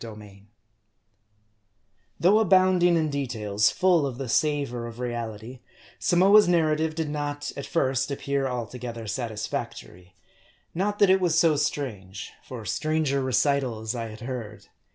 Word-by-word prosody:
r 110 -2 -8 2.0
THOUGH 195 +5 +5
abounding 185 -3 +4
in 155 -2 0
details 110 -7 0
full 180 -6 +2
of 125 -3 -6
the 135 -1 -5
savor 135 -3 0
of 115 0 -10
reality, 120 0 -5 0.4
Samoa's 195 +3 +5
narrative 160 -2 +1
did 160 -1 -2
not 145 -1 -4
at 140 - -6
first 135 -4 0
appear 140 -1 -1
altogether 120 -1 -5
satisfac 110 0 -4
tory. 90 +1 -16 0.6
Not 205 +4 -1
that 200 -2 +5
it 190 0 +4
was 170 -3 +2
so 165 -2 +4
strange; 105 -10 -3
for 120 -4 -8
stranger 150 +4 0
recitals 130 -3 0
I 115 -2 -4
had 110 0 -11
heard. 120 -4 -7
135 Hz, 135 wpm, -26 LUFS, 115-160 Hz, 2.0 s, THOUGH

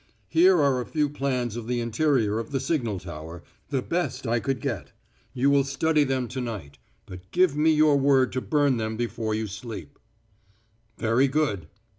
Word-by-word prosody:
"Here 180 +2 +5
are 140 -4 +2
a - - -5
few 150 -2 0
plans 130 -5 -2
of 120 -1 -6
the 125 0 -1
interior 115 -2 +1
of 115 - -5
the 135 - -1
signal 125 - -1
tower 85 -1 -9 0.3
the 135 -3 -1
best 175 -5 -2
I 115 0 +1
could 135 +1 -2
get. - - -4 0.4
You 135 +2 +2
will 140 -1 +4
study 150 +3 +1
them 130 -2 -1
to 130 +1 -4
night; 100 - -6 0.3
but 90 0 -11
give 180 -4 +3
me 155 +2 +3
your 155 -2 +4
word 135 -2 +3
to 130 - -2
burn 145 -3 +2
them 110 -1 -3
before 115 -2 -2
you 110 0 -2
sleep." 105 - -8 1.0
"Very 115 +4 +2
good." 130 - -1
130 Hz, 180 wpm, -26 LUFS, 110-145 Hz, 1.0 s, Here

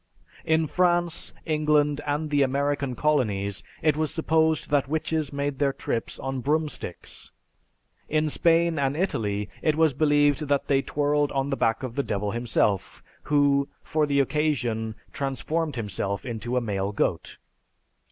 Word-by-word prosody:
In 160 0 +3
France, 175 0 +1
England, 150 -2 +2
and 150 +1 -1
the 145 -1 +3
American 140 0 0
Colonies, 105 -10 0 0.2
it 155 -2 +4
was 155 0 -1
supposed 160 -2 +1
that 140 -2 +2
witches 155 -1 -1
made 140 -1 -2
their 140 -1 +3
trips 115 -3 -3
on 135 0 -3
broomsticks; 150 - -3 0.8
in 155 0 +2
Spain 165 +1 +3
and 140 +1 0
Italy 105 - -1
it 155 - +2
was 160 -2 +3
believed 145 +1 +3
that 140 -1 +1
they 135 -1 +2
twirled 145 +1 0
on 135 +1 -1
the - - +1
back 115 -1 0
of 125 -3 -4
the 140 - 0
Devil 105 -5 -2
himself, 110 -4 0 0.2
who, 145 -1 +3
for 155 -1 0
the 140 -1 +2
occasion, 125 -7 0 0.2
transformed 145 +2 -2
himself 100 -1 -3
into 120 +1 -2
male 100 -4 -2
goat. 105 - -1
145 Hz, 140 wpm, -26 LUFS, 125-155 Hz, 0.8 s, it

